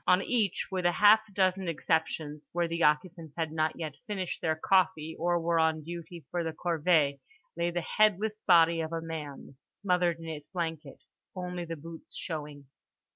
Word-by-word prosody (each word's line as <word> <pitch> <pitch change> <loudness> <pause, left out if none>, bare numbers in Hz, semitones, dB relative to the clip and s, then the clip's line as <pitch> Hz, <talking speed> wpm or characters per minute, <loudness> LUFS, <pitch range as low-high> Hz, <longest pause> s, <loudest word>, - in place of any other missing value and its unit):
On 180 +2 +5
each, 215 -7 0
with 185 -1 -1
half 205 +5 +6
a - - -18
dozen 190 -1 +1
exceptions 160 -2 -1
(where 170 0 +1
the 165 0 -3
occupants 160 0 +1
had 160 -2 -1
not 155 0 0
yet 155 -4 -5
finished 190 -4 -3
their 160 -1 +1
coffee 160 -2 +1
or 175 +1 +2
were 165 0 +1
on 160 -1 +2
duty 170 -1 -8
for 175 -1 -1
the 160 -1 -3
corvée) 155 -4 +2 0.4
lay 170 - 0
the 175 -1 -3
headless 215 +1 +3
body 170 -2 +6
of 160 0 -4
a 165 - -1
man 150 -4 -7 0.2
smothered 180 -3 +1
in 165 - -10
its 150 -2 -6
blanket, 160 -5 -4 0.4
only 180 -1 -4
the 165 0 -5
boots 165 +2 -11
showing. 150 -3 -6
165 Hz, 175 wpm, -30 LUFS, 160-180 Hz, 0.4 s, half